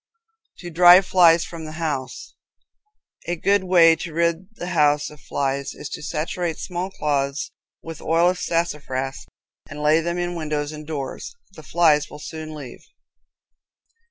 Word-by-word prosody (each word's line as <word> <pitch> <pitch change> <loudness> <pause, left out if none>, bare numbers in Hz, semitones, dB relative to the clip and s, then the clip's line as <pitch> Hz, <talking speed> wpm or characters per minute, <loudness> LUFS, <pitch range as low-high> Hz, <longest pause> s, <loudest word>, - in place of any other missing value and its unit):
To 175 -1 -9
Drive 175 +3 +7
Flies 170 -3 +5
from 165 -2 -8
the 155 - -8
House. 155 -5 -4 0.9
A 175 - -1
good 200 +3 +2
way 170 -3 +6
to 165 0 -6
rid 170 +2 0
the 175 - -6
house 150 -4 +2
of 150 - -15
flies 140 0 -3
is 145 - -8
to - - -7
saturate 160 +2 -3
small 180 +1 -4
cloths 140 -5 -2 0.3
with 165 -1 -8
oil 170 +2 +3
of 180 - -7
sassafras 140 -6 -3 0.4
and 145 - -8
lay 155 +2 +4
them 170 +1 -3
in 175 0 -2
windows 150 -3 -3
and 155 -1 -9
doors. 145 - -6 0.2
The 160 - -13
flies 155 -1 +2
will 150 - -10
soon 155 +1 -8
leave. 135 -5 -10
160 Hz, 155 wpm, -22 LUFS, 150-175 Hz, 0.9 s, Drive